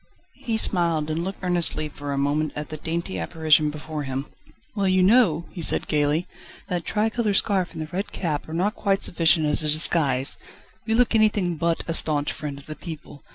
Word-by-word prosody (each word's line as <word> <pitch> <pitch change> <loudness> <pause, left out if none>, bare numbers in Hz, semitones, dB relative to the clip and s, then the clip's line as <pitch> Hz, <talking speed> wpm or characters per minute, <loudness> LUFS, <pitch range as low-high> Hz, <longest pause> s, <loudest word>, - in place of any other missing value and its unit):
He 225 -3 -1
smiled, 165 -7 +1
and 165 +2 -2
looked 190 +1 -7
earnestly 175 -3 +4
for 145 -1 -8
a 140 - -3
moment 145 +2 -1
at 150 0 -6
the 155 - -6
dainty 160 - -4
apparition 155 - +2
before 150 0 -6
him. 135 0 -4 0.5
"Well, 200 -2 0
you 185 0 +2
know!" 185 -6 +3
he 180 - -8
said - - +1
gaily, 150 +3 0 0.4
"that 175 -2 -3
tricolour 220 -1 -1
scarf 190 -3 +1
and 160 - -5
the 155 - -11
red 195 +3 -4
cap 155 -4 -4
are - - -7
not 195 +5 0
quite 195 -3 -1
sufficient 160 -2 +3
as 150 +1 +4
a 155 - 0
disguise: 150 -4 +3 0.5
you 225 - +1
look 245 0 +2
anything 210 -5 +2
but 165 +1 -1
a 165 - -2
staunch 150 -3 +3
friend 145 -2 -6
of 140 - -14
the 155 - -8
people. 155 -4 -10
160 Hz, 200 wpm, -23 LUFS, 150-185 Hz, 0.5 s, earnestly